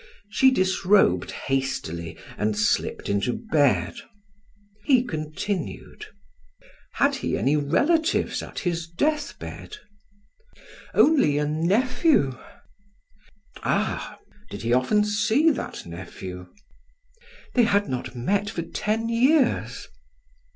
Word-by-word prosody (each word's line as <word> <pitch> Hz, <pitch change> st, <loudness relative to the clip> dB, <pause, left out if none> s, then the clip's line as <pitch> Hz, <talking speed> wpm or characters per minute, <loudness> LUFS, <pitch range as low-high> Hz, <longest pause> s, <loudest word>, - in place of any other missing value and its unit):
She 265 Hz, +5 st, +5 dB
disrobed 185 Hz, -, +2 dB
hastily 85 Hz, -12 st, -3 dB, 0.2 s
and 105 Hz, 0 st, -1 dB
slipped 105 Hz, 0 st, 0 dB
into 100 Hz, +4 st, 0 dB
bed. 135 Hz, -, +1 dB, 0.9 s
He 255 Hz, -3 st, +4 dB
continued: 155 Hz, -, -5 dB, 0.9 s
"Had -, -, +2 dB
he -, -, -2 dB
any 130 Hz, -, +2 dB
relatives 305 Hz, -, +1 dB
at -, -, -10 dB
his 170 Hz, -2 st, -2 dB
death 295 Hz, -, -1 dB
bed?" 425 Hz, -, -9 dB, 1.2 s
"Only 275 Hz, -, +4 dB
a 150 Hz, -, +1 dB
nephew." 170 Hz, -, +2 dB, 1.3 s
"Ah! -, -, -1 dB, 0.3 s
Did 100 Hz, -, -7 dB
he 115 Hz, +1 st, +1 dB
often 130 Hz, +12 st, +3 dB
see 220 Hz, +9 st, +3 dB
that 285 Hz, -, -5 dB
nephew?" 90 Hz, +1 st, -8 dB, 1.1 s
"They 245 Hz, -2 st, +4 dB
had 205 Hz, -2 st, +2 dB
not 125 Hz, 0 st, -4 dB
met 200 Hz, +12 st, 0 dB
for 170 Hz, -, -4 dB
ten 215 Hz, +6 st, -2 dB
years." 255 Hz, +4 st, +2 dB
170 Hz, 100 wpm, -24 LUFS, -, 1.3 s, She